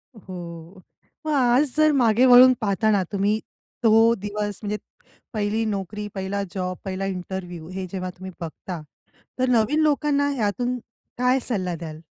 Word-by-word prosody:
हो. 175 -2 -9 0.4
मग 310 - -1
आज 255 +1 +3
जर 310 0 +5
मागे 245 -3 +4
वळून 255 0 +9
पाहताना 205 -1 +2
तुम्ही 205 +2 +1 0.4
तो 225 +1 +6
दिवस 205 -1 -4
म्हणजे 210 0 -2 0.6
पहिली 215 +1 0
नोकरी, 210 0 -3
पहिला 195 +1 -2
जॉब, 185 -1 -3
पहिला 190 0 -3
इंटरव्ह्यू. 180 -3 -5
हे 185 0 -5
जेव्हा 185 -1 -3
तुम्ही 185 +1 -9
बघता 165 +1 -6 0.6
तर 255 0 +2
नवीन 245 +6 +3
लोकांना 285 -1 +2
यातून 245 +3 -1 0.4
काय 250 +2 +3
सल्ला 185 -7 -1
द्याल? 160 -1 -8
205 Hz, 140 wpm, -24 LUFS, 185-245 Hz, 0.6 s, वळून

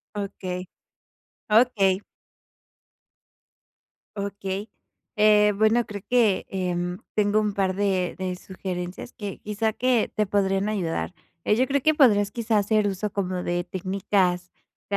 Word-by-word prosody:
Okey. 185 -2 -4 0.8
Okey. 210 -4 +4 2.2
Okey, 200 0 -4 0.5
eh, 210 0 +5
bueno, 220 +3 +3
creo 205 -2 -7
que, 235 -6 +3
em, 180 -1 -2 0.2
tengo 210 0 +3
un 210 -1 0
par 195 -1 0
de 190 -2 0
de 185 -1 -3
sugerencias 180 +2 -6
que, 205 -4 -7
quizá, 215 +1 -1
que 250 0 +1
te 215 - +2
podrían 195 0 +1
ayudar. 185 -5 -2 0.3
Eh, 210 - +3
yo 255 +3 +3
creo 280 +2 +1
que 310 +2 +4
podrás, 205 -9 +4
quizás, 225 -1 +1
hacer 215 0 +2
uso 200 +1 -2
como 185 -2 -2
de 175 0 -1
técnicas 185 -1 -1 0.4
de 200 - 0
200 Hz, 130 wpm, -25 LUFS, 185-215 Hz, 2.2 s, eh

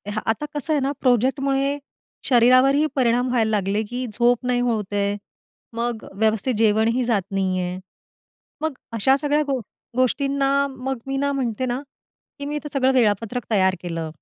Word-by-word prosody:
हा 215 - -1
आता 295 +7 -4
कसं 295 +2 -1
आहे 295 - +2
ना, 275 +1 0
प्रोजेक्टमुळे 270 +3 +1 0.5
शरीरावरही 255 +4 +5
परिणाम 245 -1 +2
व्हायला 230 -3 +2
लागले, 205 +1 0
की 245 +4 -4
झोप 240 +1 +2
नाही 250 -1 +1
होत 210 -3 -2
आहे. 200 0 0 0.6
मग 235 -1 -2
व्यवस्थित 220 +4 +1
जेवणही 225 +3 +3
जात 220 -5 +2
नाही 190 -1 0
आहे. 180 0 -3 0.8
मग 315 -2 -1 0.2
अशा 265 +5 +4
सगळ्या 295 +1 +2
गो 270 -2 0 0.4
गोष्टींना 275 +2 +1 0.2
मग 265 +1 -3
मी 270 0 -2
ना 280 +1 0
म्हणते 255 -2 -2
ना, 250 +2 -2 0.6
की 285 - -5
मी 295 +1 -3
इथं 295 0 -5
सगळं 265 -1 +2
वेळापत्रक 230 0 +1
तयार 190 -2 +3
केलं. 165 -2 -4
245 Hz, 160 wpm, -22 LUFS, 215-270 Hz, 0.8 s, शरीरावरही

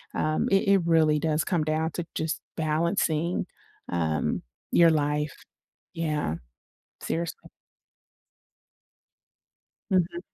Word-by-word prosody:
um, 155 0 +1
it 195 0 +3
it 195 -1 +5
really 160 -2 +4
does 155 0 +1
come 170 -4 0
down 160 +1 0
to 175 - -4
just 160 0 -1 0.2
balancing, 160 +1 +1 0.4
um, 80 -3 0 0.3
your 170 -1 +6
life. 150 -1 0 0.6
Yeah. 150 - -1 0.7
Seriously. 170 +1 -3 2.4
Mhm. 185 - +1
160 Hz, 95 wpm, -27 LUFS, 150-170 Hz, 2.4 s, your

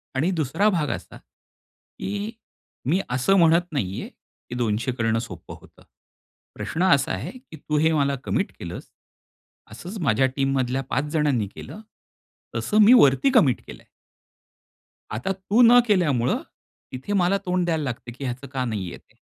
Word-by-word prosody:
आणि 155 +8 +1
दुसरा 170 +6 +1
भाग 165 -7 0
असा - - -6
की 205 +2 -9 0.6
मी 180 +4 +3
असं 130 +11 +2
म्हणत 170 +1 +4
नाहीये 95 -9 -3
की 120 - -14
200 120 +1 -1
करणं 115 -2 0
सोप्प 95 -8 -9
होतं. - - -14 0.7
प्रश्न 170 +3 -3
असा 140 -1 +1
आहे 95 +8 -4
की 255 -11 -13
तू 150 +1 -2
हे 160 +2 +3
मला 140 -2 +1
कमिट - - -1
केलंस. - - -8 0.8
असंच 180 - -8
माझ्या 130 -2 +3
टीममधल्या 135 -1 0
5 140 - 0
जणांनी 140 -9 +1
केलं. 215 - -9 0.7
तसं 210 - -1
मी 225 +4 +8
वरती 145 - +5
कमिट 140 - +4
केलंय. - - -11 1.3
आता 120 - -2
तू 195 +5 +1
न 240 +1 +8
केल्यामुळं, 145 - +2 0.5
तिथे 130 +11 -5
मला 190 0 +2
तोंड 180 -1 0
द्यायला 160 -3 0
लागते 120 -2 -5
की 130 +4 -10
ह्याचं 130 +2 -5
का 130 -2 -1
नाहीये 100 -6 -4
ते. - - -28
145 Hz, 150 wpm, -24 LUFS, 125-185 Hz, 1.3 s, मी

